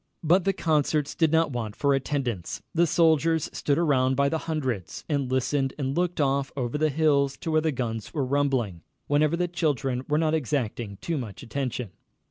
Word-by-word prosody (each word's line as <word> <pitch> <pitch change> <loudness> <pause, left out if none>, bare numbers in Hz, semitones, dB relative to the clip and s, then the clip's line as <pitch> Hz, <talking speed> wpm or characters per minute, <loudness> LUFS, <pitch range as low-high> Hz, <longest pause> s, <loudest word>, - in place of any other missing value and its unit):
But 175 +3 +3
the 195 - +4
concerts 150 -3 +1
did 160 -3 +2
not 160 -2 +3
want 110 -4 -4
for 140 -1 +2
attendance. 130 - -2
The 170 +1 +3
soldiers 160 -1 +3
stood 145 -1 0
around 130 -5 +2
by 140 +1 +2
the 160 - -1
hundreds, 125 - -3
and 140 -4 -1
listened 135 +1 0
and 135 -1 -2
looked 175 -1 0
off 140 -1 +1
over 120 -1 -2
the 155 +1 +2
hills 140 -2 +2
to 165 - -4
where 155 0 +3
the 160 0 +1
guns 115 -5 -4
were 145 -5 -1
rumbling, 130 -10 0 0.2
whenever 150 +3 +2
the 180 0 +1
children 140 -7 -1
were 150 - +2
not 155 0 +1
exacting 120 -8 -2
too 165 -3 -2
much 110 -6 -7
attention. 125 -4 -3
140 Hz, 185 wpm, -26 LUFS, 130-155 Hz, 0.2 s, the